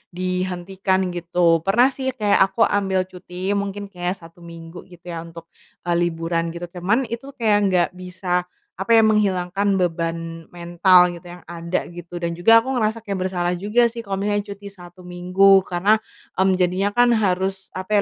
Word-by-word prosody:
dihentikan, 185 +1 -1
gitu. 175 -1 +2
Pernah 220 +10 +3
sih 265 0 -5
kayak 210 -4 +2
aku 195 +4 +1
ambil 190 -2 +1
cuti 185 +1 -6
mungkin 200 0 -3
kayak 180 0 -3
1 165 -2 -16
minggu 170 +1 -11
gitu 175 -2 -17
ya 165 - -5
untuk, 165 0 -11 0.3
eee, 175 -1 0
liburan, 165 0 -3
gitu. 170 - -7 0.2
Cuman 210 +9 +1
itu 270 +4 -7
kayak 215 -3 +2
nggak 180 -2 +2
bisa, 180 -1 -2 0.3
apa 195 +3 -7
ya, 225 - +6
menghilangkan 200 -2 +1
beban 165 -2 -1 0.3
mental 175 +1 +3
gitu 170 - -10
yang 175 0 -12
ada 170 +1 -3
gitu 175 0 -9
dan 170 -1 -3
juga 185 +7 +5
aku 260 +4 0
ngerasa 225 -2 -1
kayak 200 -3 -3
bersalah 175 -1 -1
juga 210 +7 +2
sih 235 0 -3
kalo 200 -3 -4
misalnya 205 +1 -1
cuti 200 0 -9
1 175 -1 -14
minggu 185 +2 +4
karena, 185 +3 +1 0.5
mmm, 190 -1 +3
jadinya 185 +2 +1
kan 240 +3 +3
harus, 190 -2 -1
apa 200 +2 +1
185 Hz, 170 wpm, -21 LUFS, 175-205 Hz, 0.5 s, ya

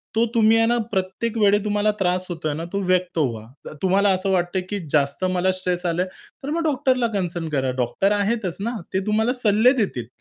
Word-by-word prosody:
तो 230 +1 +3
तुम्ही 225 0 +5
आहे 225 - +4
ना 240 0 +2
प्रत्येक 195 +4 -2
वेळी 205 -1 +4
तुम्हाला 210 0 +1
त्रास 185 0 +1
होतोय 160 -3 -3
ना, 165 +3 -5
तो 200 - 0
व्यक्त 180 -1 0
व्हा. 115 -6 -1 0.2
त - - -8
तुम्हाला 195 +2 +3
असं 190 +1 -1
वाटतंय 180 0 0
की 205 -1 -2
जास्त 145 +4 +1
मला 185 0 +1
स्ट्रेस 180 -1 -2
आलंय, 175 +2 0 0.4
तर 280 - -4
मग 335 +2 -1
डॉक्टरला 260 -5 +1
कन्सर्न 175 -4 -2
करा. 135 -3 0
डॉक्टर 130 - 0
आहेतच 205 -3 -1
ना 230 +4 -3 0.2
ते 190 - +2
तुम्हाला 220 +4 +2
सल्ले 220 +4 +5
देतील. 120 - -5
190 Hz, 200 wpm, -22 LUFS, 175-220 Hz, 0.4 s, तुम्ही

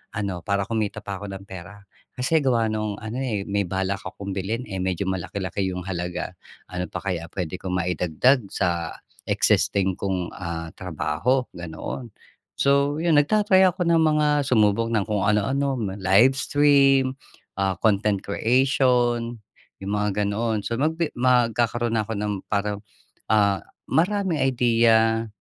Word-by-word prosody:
ano 100 -4 -2
para 100 +3 -1
kumita 105 -1 -3
pa 100 -2 -5
ako 105 - -7
ng 95 0 -7
pera, 100 +1 -11 0.3
kasi 135 +6 +2
gawa 115 -5 +1
nung 110 -1 -2
ano 110 +4 -4
eh, 110 -7 -2
may 100 -2 -1
balak 95 +1 -2
akong 100 0 -7
bilhin 100 +6 -3
eh, 95 - -3
medyo 95 +1 -1
malaki-laki 95 +1 -3
yung 90 -1 -4
halaga. 90 -1 -4 0.4
Ano 90 -1 -3
pa - - -7
kaya 85 -4 -3
pwede 90 -1 -4
ko - - -7
maidagdag 90 - +1
sa 85 -4 -2 0.3
existing 95 -2 +2
kong 95 -3 -2
ah, 85 -2 -5
trabaho", 95 - -1
ganoon. 85 +8 -7 0.5
So 140 +2 +2
yun 160 -4 +5
nagta-try 190 +3 +4
ako 180 0 -1
ng 165 - +4
mga 150 -1 +3 0.2
sumubok 110 -2 +3
ng 110 - +2
kung 105 -3 0
ano-ano. 135 +7 +1 0.2
Live 115 +9 +4
stream, 135 -2 +3 0.4
ah, 95 -1 +1
content 100 -1 +1
creation, 120 +1 +1 0.5
yung 100 - -4
mga 105 0 0
ganoon. 110 0 -1
So 115 +2 -3
magbi 160 +2 0
magkakaroon 120 -2 +2
na 105 - -2
ako 110 - -3
ng 105 0 -1
parang 100 0 -1 0.5
ah, 100 -2 +3 0.3
maraming 185 -1 +1
idea, 115 -3 +3
105 Hz, 145 wpm, -24 LUFS, 95-130 Hz, 0.5 s, yun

